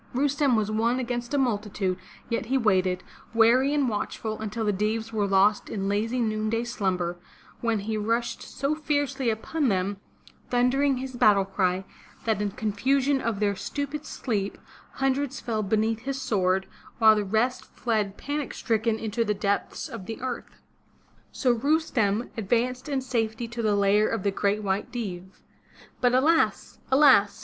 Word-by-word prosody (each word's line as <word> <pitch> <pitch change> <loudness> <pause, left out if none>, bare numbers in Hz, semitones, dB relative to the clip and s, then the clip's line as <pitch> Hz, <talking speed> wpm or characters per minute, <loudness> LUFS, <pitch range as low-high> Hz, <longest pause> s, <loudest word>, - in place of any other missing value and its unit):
Rustem 280 -1 +2
was 215 -1 0
one 230 +3 +1
against 240 -1 -3
a - - +2
multitude, 210 -7 0 0.3
yet 230 0 -2
he 265 +2 +2
waited, 185 -6 +2 0.3
wary 240 +5 +5
and 290 -3 +2
watch 210 -3 -2
ful, 220 -1 -4
until 220 +1 -3
the 210 - +2
Deevs 220 +3 -1
were 210 -2 +1
lost 195 +2 +3
in 195 -2 -3
lazy 220 +5 0
noonday 220 0 0
slumber, 185 -7 -2 0.4
when 230 -3 0
he 215 +2 -2
rushed 230 +3 -1
so 275 +2 -2
fiercely 290 -4 0
upon 270 +7 -1
them, 195 -1 0 0.5
thundering 260 +3 +2
his 260 0 -5
battle 205 -4 +5
cry, 190 -1 0 0.4
that 220 -3 +1
in 205 - 0
confusion 260 +7 +1
of 225 -4 -2
their 205 -1 +1
stupid 285 +7 -4
sleep, 205 -6 -2 0.4
hundreds 270 0 0
fell 220 -2 -2
beneath 220 +2 +1
his 270 +3 -4
sword, 190 -5 +1 0.3
while 220 -2 +7
the 210 - 0
rest 220 +6 0
fled 210 -4 -1
panic 290 0 -4
stricken 225 -1 0
into 225 +1 -1
the 210 -2 0
depths 200 0 -1
of 185 - -8
the 225 - -5
earth. 255 -1 -6 0.7
So 255 - +1
Rustem 240 -6 +1
advanced 245 +6 -1
in 275 -2 0
safety 230 -2 -2
to 240 0 -4
the 215 -2 +2
lair 200 +1 +3
of 225 -5 -2
the 200 - +1
Great 205 +2 0
White 200 +4 -1
Deev. 190 -6 -6 0.6
But 245 0 +3
alas! 320 +6 +2
alas! 265 -7 +5
225 Hz, 160 wpm, -26 LUFS, 205-255 Hz, 0.7 s, while